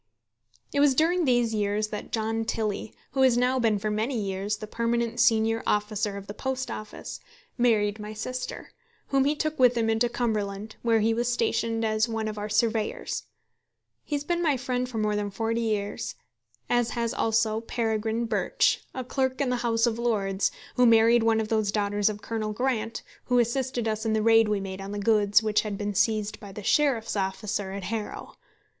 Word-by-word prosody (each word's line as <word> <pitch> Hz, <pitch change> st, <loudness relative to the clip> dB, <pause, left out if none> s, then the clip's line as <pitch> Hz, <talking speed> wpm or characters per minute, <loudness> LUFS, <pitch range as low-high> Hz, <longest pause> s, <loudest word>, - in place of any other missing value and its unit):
It 285 Hz, -, +1 dB
was 285 Hz, -2 st, +5 dB
during 335 Hz, +4 st, +3 dB
these 240 Hz, -3 st, +2 dB
years 210 Hz, 0 st, 0 dB
that 210 Hz, -, -6 dB
John 225 Hz, 0 st, -1 dB
Tilley, 220 Hz, -1 st, -2 dB, 0.2 s
who 265 Hz, +1 st, 0 dB
has 255 Hz, -2 st, +5 dB
now 250 Hz, +1 st, +2 dB
been 225 Hz, -3 st, +2 dB
for 210 Hz, +1 st, -2 dB
many 225 Hz, +5 st, -1 dB
years 200 Hz, +1 st, -2 dB
the 215 Hz, -, -7 dB
permanent 235 Hz, +1 st, -1 dB
senior 225 Hz, 0 st, +3 dB
officer 210 Hz, -1 st, 0 dB
of 200 Hz, -, -8 dB
the 205 Hz, -, -7 dB
Post 265 Hz, +2 st, -3 dB
Office, 215 Hz, -, -7 dB, 0.4 s
married 215 Hz, -4 st, +2 dB
my 210 Hz, 0 st, -6 dB
sister, 255 Hz, +4 st, -5 dB, 0.4 s
whom 270 Hz, -1 st, +3 dB
he 295 Hz, +2 st, +2 dB
took 310 Hz, 0 st, -2 dB
with 250 Hz, -1 st, +5 dB
him 225 Hz, -1 st, +2 dB
into 225 Hz, +2 st, +2 dB
Cumberland, 215 Hz, -3 st, -2 dB
where 230 Hz, -2 st, +3 dB
he 225 Hz, +1 st, +3 dB
was 240 Hz, +1 st, 0 dB
stationed 230 Hz, -1 st, 0 dB
as 215 Hz, +1 st, +1 dB
one 225 Hz, -1 st, -2 dB
of 215 Hz, -1 st, -4 dB
our 210 Hz, +1 st, -4 dB
surveyors. 220 Hz, 0 st, -1 dB, 0.8 s
He 295 Hz, -, -3 dB
has 285 Hz, -, -2 dB
been 345 Hz, +3 st, -1 dB
my 300 Hz, -5 st, +2 dB
friend 250 Hz, 0 st, -2 dB
for 235 Hz, -, -5 dB
more 210 Hz, -1 st, +1 dB
than 205 Hz, -1 st, -1 dB
forty 225 Hz, +3 st, -1 dB
years; 210 Hz, -3 st, -2 dB, 0.5 s
as 240 Hz, -1 st, +2 dB
has 235 Hz, -1 st, 0 dB
also 225 Hz, -1 st, +1 dB
Peregrine 225 Hz, 0 st, -1 dB
Birch, 225 Hz, -, +1 dB
a 260 Hz, -, -3 dB
clerk 260 Hz, 0 st, -1 dB
in 280 Hz, -3 st, +1 dB
the 250 Hz, -, +1 dB
House 230 Hz, -1 st, +1 dB
of 235 Hz, -1 st, -1 dB
Lords, 200 Hz, -5 st, +1 dB, 0.3 s
who 250 Hz, -1 st, +6 dB
married 230 Hz, +1 st, +6 dB
one 225 Hz, 0 st, +3 dB
of 215 Hz, -1 st, -2 dB
those 215 Hz, -2 st, +1 dB
daughters 205 Hz, 0 st, +1 dB
of 210 Hz, 0 st, -6 dB
Colonel 215 Hz, -2 st, -3 dB
Grant 230 Hz, -2 st, -2 dB, 0.2 s
who 250 Hz, -, +2 dB
assisted 240 Hz, 0 st, 0 dB
us 220 Hz, 0 st, -1 dB
in 220 Hz, -1 st, 0 dB
the 215 Hz, -1 st, +1 dB
raid 225 Hz, 0 st, +5 dB
we 210 Hz, -1 st, +1 dB
made 195 Hz, 0 st, -6 dB
on 195 Hz, +1 st, -6 dB
the -, -, -3 dB
goods 205 Hz, 0 st, +3 dB
which 215 Hz, -1 st, +2 dB
had 210 Hz, -2 st, -4 dB
been 205 Hz, 0 st, -2 dB
seized 215 Hz, +1 st, +1 dB
by 205 Hz, -3 st, -10 dB
the 205 Hz, +1 st, -8 dB
Sheriff's 260 Hz, -4 st, +2 dB
officer 200 Hz, 0 st, -2 dB
at 195 Hz, 0 st, -5 dB
Harrow. 215 Hz, +2 st, -5 dB
225 Hz, 195 wpm, -27 LUFS, 210-240 Hz, 0.8 s, who